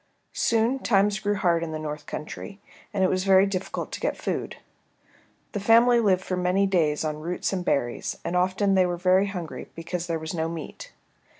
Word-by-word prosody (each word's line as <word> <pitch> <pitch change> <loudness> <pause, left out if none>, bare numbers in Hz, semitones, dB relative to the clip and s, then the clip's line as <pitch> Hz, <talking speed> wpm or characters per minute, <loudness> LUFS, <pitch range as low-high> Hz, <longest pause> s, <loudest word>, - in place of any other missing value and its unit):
Soon 230 +4 +1
times 205 -3 +2
grew 205 -1 0
hard 170 -4 +2
in 165 -1 -4
the - - -2
North 150 -1 -6
Country, 195 +6 -7 0.3
and 195 -2 0
it - - +5
was 185 0 0
very 190 0 +6
difficult 190 -1 -4
to - - -5
get - - -1
food. - - -3 1.0
The 205 - -3
family 235 +4 +5
lived 190 -4 +2
for 185 - -2
many 180 +2 +2
days 160 -6 +1
on 150 -1 -3
roots 175 +4 -2
and 185 -2 -2
berries, 120 -8 -1
and 175 - -2
often 185 +2 +2
they 185 -1 +4
were 175 -1 -2
very 185 +2 +3
hungry 170 -10 -6
because 170 +1 -4
there 165 -1 -1
was 160 +1 -6
no 160 -1 -1
meat. - - -8
185 Hz, 195 wpm, -25 LUFS, 165-200 Hz, 1.0 s, very